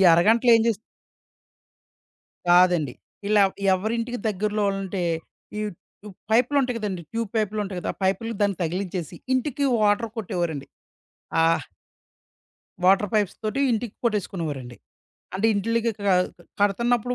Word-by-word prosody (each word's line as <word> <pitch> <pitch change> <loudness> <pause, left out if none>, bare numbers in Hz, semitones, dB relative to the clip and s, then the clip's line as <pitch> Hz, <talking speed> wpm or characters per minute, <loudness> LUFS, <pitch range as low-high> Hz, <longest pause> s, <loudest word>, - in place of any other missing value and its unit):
అరగంటలో 225 +8 +4
ఏం 225 - +2
చేస్ 220 - 0 1.7
కాదండి. 175 -6 +5 0.4
ఇలా 210 -1 +5 0.3
ఎవరింటికి 230 +5 -2
దెగ్గరలో 210 +1 0
ఆళ్లుంటే 195 -1 -2 0.6
ఈ - - -1 0.5
ఇప్ 190 - -13
పైప్ 240 +3 +4
లుంటాయి 255 -4 +2
కదండీ, 190 -5 -3
ట్యూబ్ 230 -3 -2
పైప్‌‌లుంటాయి 205 -3 -1
కదా. - - -2
ఆ - - -37
పైపులకి 200 +4 0
దాన్ని 200 -3 +1
తగిలించేసి 180 -1 -3 0.2
ఇంటికి 280 +2 0 0.2
వాటర్ 210 +2 +2
కొట్టేవారండి. 170 -8 -3 0.7
ఆహ్ 165 -4 +3 1.2
వాటర్ 195 +1 +5
పైప్స్ 205 -3 +1
తోటి 215 +6 -1
ఇంటికి 225 -1 -2
కొట్టేసుకునేవారండి. 165 - -2 0.6
అంటే 205 +4 +1
ఇంటిలికికడ 220 0 0 0.5
కడతన్నప్పుడు 235 +4 +2
205 Hz, 110 wpm, -24 LUFS, 185-230 Hz, 1.7 s, కాదండి